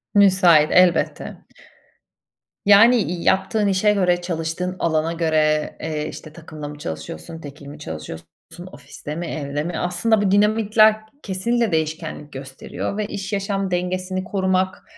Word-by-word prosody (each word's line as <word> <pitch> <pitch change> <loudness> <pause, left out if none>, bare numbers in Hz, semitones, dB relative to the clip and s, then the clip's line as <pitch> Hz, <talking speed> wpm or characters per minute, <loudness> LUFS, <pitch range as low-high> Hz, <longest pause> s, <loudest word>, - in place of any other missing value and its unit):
Müsait, 185 -6 +5
elbette. 180 -1 +3 1.4
Yani, 220 +5 +7
i 180 -5 -2
yaptığın 195 +2 +1
işe 200 +2 +2
göre, 180 -3 +1
çalıştığın 175 +1 -3
alana 160 0 0
göre, 155 -2 0
eee, 155 -1 -3
işte, 155 - -10
takımla 155 -2 -9
mı 145 0 -9
çalışıyorsun 80 - -7
tekil 145 -1 -11
mi 145 - -10
çalışıyorsun, 80 +1 -8 0.5
ofiste 145 +2 -9
mi, 170 +2 -4
evde 145 -1 -4
mi? 175 +2 -4
Aslında 205 +5 +1
bu 195 -2 +1
dinamikler 215 +1 +4 0.3
kesinlikle 225 +4 -1
değişkenlik 160 -2 -3
gösteriyor 135 +8 -6
ve 215 - -1
iş, 200 +1 -6
yaşam 195 -1 -2
dengesini 185 +1 -2
korumak, 185 -1 -1
180 Hz, 130 wpm, -21 LUFS, 155-195 Hz, 1.4 s, Yani